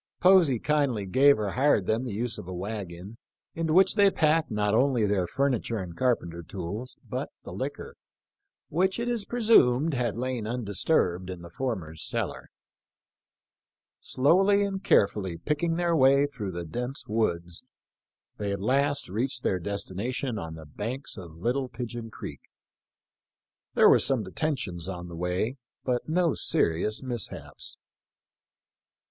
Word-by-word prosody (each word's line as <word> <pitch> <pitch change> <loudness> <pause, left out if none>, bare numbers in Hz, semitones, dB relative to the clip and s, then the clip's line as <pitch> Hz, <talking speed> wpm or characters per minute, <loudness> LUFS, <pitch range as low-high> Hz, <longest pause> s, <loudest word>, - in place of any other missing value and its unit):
Posey 180 -8 +6
kindly 140 -6 0
gave 140 +9 +5
or 105 -2 -1
hired 130 -6 +3
them 110 +5 0
the 120 - -4
use 110 +2 -3
of - - -9
a 95 - -5
wagon, 100 +1 -6 0.3
into 165 -1 -1
which 190 +3 +5
they 205 -2 +5
packed 160 -2 +2
not 105 -2 0
only 125 -1 +3
their 100 -3 +1
furniture 130 -3 0
and 90 -4 -6
carpenter 85 -8 0
tools, 100 +9 -6
but - - -3
the - - -8
liquor, - - -5 0.7
which 185 +4 +1
it 235 - -2
is 235 -4 -1
presumed 165 - +4
had 120 -4 -1
lain 125 -2 -3
undisturbed 100 - 0
in 90 -2 -7
the 85 - -10
former's 90 -9 -4
cellar. - - -3 1.5
Slowly 195 +9 +3
and 195 -1 -3
carefully 95 -4 +2
picking 155 - -1
their 170 -1 +1
way 140 0 +5
through 110 -10 -5
the 85 0 -5
dense 125 - -4
woods, 85 -5 -1 0.8
they 100 -1 -2
at 100 - -3
last 140 +7 +1
reached 120 +6 -1
their 95 - +1
destination 105 +6 -3
on 80 -1 -6
the 80 -1 -10
banks 115 - -5
of 85 -5 -10
Little 125 +8 -1
Pigeon 120 -1 -6
creek. - - -8 1.3
There - - +7
were - - +7
some 130 -5 +3
detentions 95 - -3
on 90 -2 -6
the 85 - -8
way, 90 +9 -1 0.3
but 125 +3 -1
no 170 -1 +2
serious 85 +9 +1
mishaps. 120 -4 -4
120 Hz, 145 wpm, -27 LUFS, 95-140 Hz, 1.5 s, There